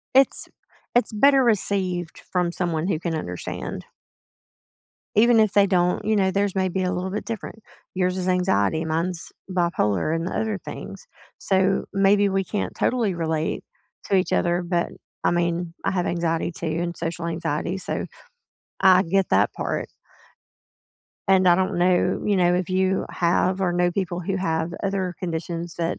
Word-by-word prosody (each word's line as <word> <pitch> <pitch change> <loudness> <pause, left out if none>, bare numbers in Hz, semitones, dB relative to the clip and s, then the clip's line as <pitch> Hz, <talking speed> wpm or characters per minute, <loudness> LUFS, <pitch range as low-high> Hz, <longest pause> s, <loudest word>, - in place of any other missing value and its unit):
It's 270 0 +4 0.5
it's 245 -1 +2
better 270 +4 +5
received 190 -5 0
from 180 -2 +1
someone 175 -1 -1
who 165 -6 0
can 170 -1 -3
understand. 90 - -5 1.3
Even 230 +2 +5
if 215 -2 +3
they 200 -1 +5
don't, 180 -2 +1
you 215 0 +2
know, 190 -1 +3
theirs 200 0 0
may 190 -1 +1
be 185 +1 -2
a 180 - 0
little 185 +1 -3
bit 210 - -4
different. 220 -1 -6 0.3
Yours 185 0 0
is 185 - -2
anxiety, 165 - +1
mine's 165 +2 -2 0.2
bipolar, 165 - +1
and 165 +2 -2
other 220 -1 -2
things, 485 - -9 0.3
so 190 0 +1
maybe 200 +1 +4
we 195 0 0
can't 205 +3 -3
totally 230 -6 +1
relate 160 -2 -2 0.4
to 195 - +1
each 185 - +1
other, 175 0 +1
but 175 0 0 0.4
I - - +4
mean, 170 0 -1
I - - +2
have 180 -2 -1
anxiety 170 0 -1
too 170 - -6 0.2
and 175 -1 -3
social 170 0 -4
anxiety, 165 +2 -2
so 190 - -3 0.8
I 185 0 +6
get 190 +2 +1
that - - +3
part. - - -3 1.4
And 190 -1 +5
I 175 - +7
don't 190 +1 0
know, 180 +1 +2
you 205 -2 +2
know, 175 -1 +3
if 180 0 -1
you 190 0 +1
have 180 +2 +1
or 180 -2 +2
know 175 0 +1
people 180 -2 -2
who 190 +2 -2
have 165 -2 -1
other 190 -2 -1
conditions 170 0 -4
that 170 0 -2
180 Hz, 165 wpm, -24 LUFS, 170-195 Hz, 1.4 s, I